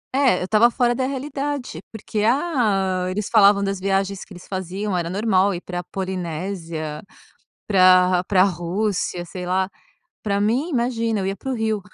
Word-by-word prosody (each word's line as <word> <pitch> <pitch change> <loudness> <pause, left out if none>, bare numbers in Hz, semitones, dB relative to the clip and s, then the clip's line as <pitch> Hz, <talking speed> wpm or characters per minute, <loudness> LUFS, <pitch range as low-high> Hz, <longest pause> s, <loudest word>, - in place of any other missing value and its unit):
É 265 -9 +3
eu - - -1
estava 220 +4 +4
fora 245 0 +1
da 260 +1 -1
realidade, 275 - -4
porque, 220 -1 -5
ah, 215 - +1
eles 205 +2 -3
falavam 200 -2 +6
das 195 -1 -2
viagens 195 0 -1
que - - -21
eles 180 -1 -12
faziam 190 +1 -3
era 170 -1 -1
normal 195 -1 +2
ir 175 - -6
pra 175 -1 -5
Polinésia, 170 -4 -4 0.7
pra 185 -2 +5
pra 185 -1 +4
Rússia, 180 0 -2
sei 180 +1 -7
lá, 185 +1 +1 0.6
para 200 -1 0
mim 240 +10 +1
imagina 230 -4 0
eu 190 - -2
ia 195 - -2
para 265 - -4
o - - -1
Rio. 220 -2 -1
195 Hz, 165 wpm, -22 LUFS, 185-225 Hz, 0.7 s, falavam